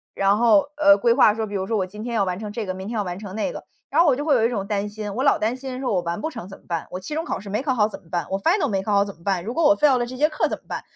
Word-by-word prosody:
然 195 +1 +3
后， 230 +3 +4
呃， 200 0 +6
规 235 +2 +3
划 210 - +5
说 220 -1 -2
比 205 - -6
如 190 -1 -1
说 225 - 0
我 190 - 0
今 210 +3 -9
天 240 -1 -4
要 200 - +2
完 180 0 -2
成 210 -1 -6
这 215 0 -4
个， 185 - -3
明 190 +2 -7
天 235 - -4
要 205 - 0
完 180 -1 -5
成 200 -3 -8
那 220 - -1
个。 - - -8 0.3
然 305 - +2
后 345 - +4
我 255 - +4
就 290 - -3
会 290 -4 +4
有 225 -2 +3
一 - - +2
种 200 -5 -3
担 205 -1 -1
心， 210 -1 -6
我 260 - -1
老 - - +4
担 225 +4 -1
心 260 -1 -6
说 250 -5 -1
我 180 - +2
完 170 +4 -3
不 315 - -2
成 180 - -8
怎 195 - -11
么 - - -30
办？ 170 -2 -3
我 180 - -4
期 245 +11 -7
中 325 - -2
考 - - -3
试 200 - -9
没 215 +5 -1
考 265 -3 +1
好 210 -2 +3
怎 - - -10
么 165 - -23
办？ 175 -1 -2
我 195 0 -1
final 335 - +2
没 195 -2 0
考 210 - -1
好 200 0 +4
怎 200 - -7
么 170 - -24
办？ 190 -3 0
如 230 +4 -4
果 330 -2 +1
我 300 +1 +6
fail 285 -4 +4
了 240 - 0
这 255 +1 -8
节 305 +3 +3
课 305 - 0
怎 - - -3
么 - - -39
办？ - - -4
210 Hz, 455 characters per minute, -23 LUFS, 195-255 Hz, 0.3 s, 呃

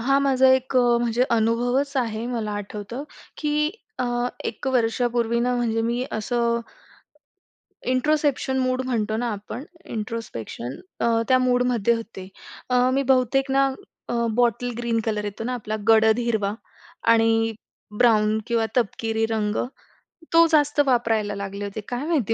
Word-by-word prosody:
हा 275 +4 +3
माझा 265 -1 +4
एक 260 0 -1
अ, 240 -1 +4
म्हणजे 240 +1 +1
अनुभवच 245 +5 +1
आहे. 230 -3 -1
मला 230 -4 -3
आठवतं, 205 +5 -6 0.4
की 300 0 +1 0.3
अ, - - 0 0.4
1 - - -5
वर्षापूर्वी 235 -1 +1
ना 250 +1 +1
म्हणजे 225 -2 0
मी 240 +2 -1
असं 235 +1 0 1.3
इंट्रोस्पेक्शन 280 -1 +1
मूड 255 0 0
म्हणतो 220 -4 -1
ना 240 +1 -1
आपण. 210 +5 -7 0.2
इंट्रोस्पेक्शन 210 - -5 0.2
अ, 230 -1 +2
त्या 255 -1 +5
मूडमध्ये 245 -3 +2
होते. 220 -5 -7 0.4
अ, 250 0 +3
मी 275 - +2
बहुतेक 265 +2 +1
ना 275 0 +4 0.4
अ, - - -2 0.2
बॉटल 245 0 +1
ग्रीन 235 -1 0
कलर 210 -2 -1
येतो 205 +2 -5
ना 250 +2 -2
आपला 215 -3 -4
गडद 220 0 +5
हिरवा 220 -4 0 0.6
आणि 225 0 +2 0.4
ब्राउन 215 -2 +4
किंवा 230 -1 +1
तपकिरी 225 -1 0
रंग 215 -1 0 0.8
तो 335 0 +7
जास्त 295 -1 +3
वापरायला 225 -5 +1
लागले 200 0 -5
होते. 200 +2 -5
काय 245 +3 -3
माहिती 285 - +1
235 Hz, 140 wpm, -24 LUFS, 220-255 Hz, 1.3 s, तो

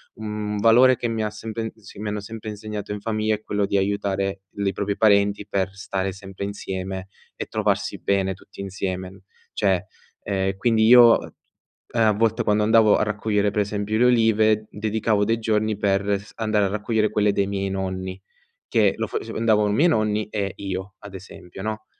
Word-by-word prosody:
un 105 -1 -4
valore 120 +4 +6
che 120 - -3
mi 115 -1 -2
ha 105 - -1
sempre 110 +1 -5
s 110 -3 -15
mi 105 +1 -5
hanno 105 0 -3
sempre 110 +1 -7
insegnato 105 0 -6
in 105 - -5
famiglia 110 -1 0
è 105 - -12
quello 100 -1 0
di 100 - +1
aiutare 100 0 -1
l 100 0 -4
i 95 - +2
propri 100 +1 -2
parenti 100 -1 +3
per 95 0 -2
stare 95 0 -3
sempre 95 0 -7
insieme 95 -1 -5 0.3
e - - -5
trovarsi - - -1
bene 95 -1 0
tutti 95 +1 -18
insieme. 95 -1 -5 0.3
Cioè, 95 -2 +1 0.4
ehm, 95 -1 -1
quindi 110 +1 +2
io, 120 0 +8
uhm, - - -9 0.6
ehm, 115 -2 +1
a - - +5
volte 110 +1 +1
quando 105 0 +2
andavo 110 -1 +5
a - - +1
raccogliere, 105 -1 0
per 105 - +1
esempio, 105 +1 -2
le 120 - +4
olive, 110 -3 +3
dedicavo 105 0 0
dei 115 +2 0
giorni 110 -1 0
per 100 0 +1
s 100 - -15
andare 110 -2 +1
a - - +2
raccogliere 105 +2 0
quelle 105 -1 +2
dei 100 -1 +1
miei 100 -1 -2
nonni, 95 -1 -4 0.5
che - - +3
lo - - -2
fac - - -4
andavano 105 -2 +2
miei 150 +12 +4
nonni 110 -7 +1
e 100 -3 -2
io 95 0 -5
,ad 100 -2 -11
esempio, 90 -1 -11
no? 110 0 -4
105 Hz, 190 wpm, -23 LUFS, 100-110 Hz, 0.6 s, io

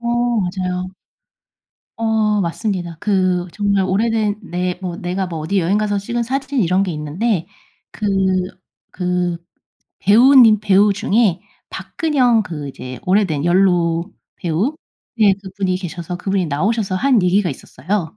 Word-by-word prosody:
어 235 - -7 0.3
맞아요. 180 0 -3 1.1
어 220 -2 +1
맞습니다. 175 -1 -3
그 185 -3 +1
정말 200 -2 +1
오래된 210 +2 0
내 180 -2 -3
뭐 180 -2 -4
내가 185 +2 -3
뭐 170 -3 -5
어디 160 +6 -1
여행 185 +5 +1
가서 210 -1 0
찍은 235 +4 -2
사진 270 +2 -2
이런 185 0 +2
게 195 - -2
있는데 165 +5 -2 0.5
그 215 - -7 0.9
그 180 -1 -1 0.6
배우 235 +8 +5
님 225 -4 +7
배우 205 0 +4
중에 205 -2 +1 0.3
박근형 255 -8 +1
그 150 -6 -6
이제 130 -1 -8
오래된 185 -6 +1
연로 175 -2 +2 0.2
배우 180 - -1 0.4
네 205 -3 +5
그분이 190 -1 -2
계셔서 175 -1 -6
그분이 190 0 -1
나오셔서 195 +7 -1
한 250 -1 +3
얘기가 180 0 +2
있었어요. 180 +7 -4
190 Hz, 265 characters per minute, -18 LUFS, 175-215 Hz, 1.1 s, 님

